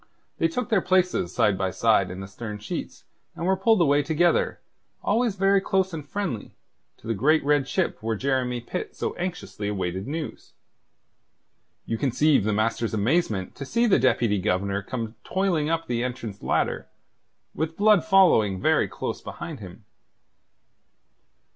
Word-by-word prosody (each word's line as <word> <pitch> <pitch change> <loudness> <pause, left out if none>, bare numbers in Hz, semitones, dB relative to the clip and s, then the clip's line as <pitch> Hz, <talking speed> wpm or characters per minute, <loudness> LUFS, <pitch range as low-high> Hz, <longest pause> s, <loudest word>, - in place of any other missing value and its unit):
They 165 - +3
took 225 +8 -3
their 210 -4 +3
places 180 - +1
side 100 0 +2
by 95 -1 0
side 105 -2 +2
in 90 +1 -7
the 95 - -7
stern 105 +2 -7
sheets, 105 - -6 0.3
and 170 - -4
were 190 +1 +3
pulled 220 +3 +3
away 145 -2 +4
together, 165 +4 +1 0.4
always 225 -1 +1
very 195 0 +3
close 190 -1 0
and 155 -2 -5
friendly, 155 - -4 0.4
to - - -20
the 115 - 0
great 145 +8 +2
red 145 -2 +2
ship 185 +4 -1
where 110 0 -1
Jeremy 125 0 -1
Pitt 150 +10 -5
so - - -3
anxiously 175 - -4
awaited 95 -1 -3
news. 155 +1 -6 1.3
You 115 - -3
conceive 140 -2 +3
the 110 - +1
master's 110 +1 0
amazement 110 - 0
to - - -5
see 235 - +1
the 210 - +4
Deputy 115 -5 +2
Governor 100 +1 0
come 115 +2 -5
toiling 180 -6 0
up 165 0 0
the 120 0 -1
entrance 120 -5 -5
ladder, - - -1 0.7
with 160 +1 -3
Blood 210 -3 +5
following 170 - +4
very - - +2
close - - -5
behind 165 -4 -7
him. 100 +1 -11
135 Hz, 155 wpm, -25 LUFS, 105-175 Hz, 1.3 s, Blood